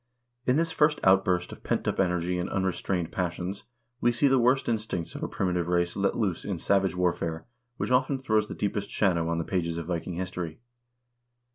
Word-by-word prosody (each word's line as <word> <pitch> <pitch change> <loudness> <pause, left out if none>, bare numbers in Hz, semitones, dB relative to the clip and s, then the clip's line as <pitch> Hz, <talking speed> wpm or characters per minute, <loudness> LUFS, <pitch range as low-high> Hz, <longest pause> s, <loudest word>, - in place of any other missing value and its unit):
In 125 - +4
this 165 +2 +1
first 150 -1 +3
outburst 95 -2 +3
of - - -10
pent - - -1
up - - 0
energy 90 -1 +1
and 90 - -2
unrestrained 95 -2 -1
passions 90 +2 -3 0.3
we 120 - +3
see 140 +4 +3
the 135 -1 +4
worst 125 +3 +3
instincts 110 -7 -2
of - - -7
a - - -1
primitive 90 -2 -1
race 85 0 +1
let 100 0 0
loose 100 -7 -1
in 100 -3 -3
savage 95 +2 +2
warfare 85 -2 -1 0.3
which - - -2
often 130 +2 +3
throws 110 -5 +1
the - - -6
deepest 100 0 -2
shadow 85 -5 +1
on 85 - 0
the 85 - 0
pages 85 -2 -1
of 85 - -4
Viking 85 +1 -3
history. 90 -2 -4
95 Hz, 190 wpm, -28 LUFS, 85-110 Hz, 0.3 s, In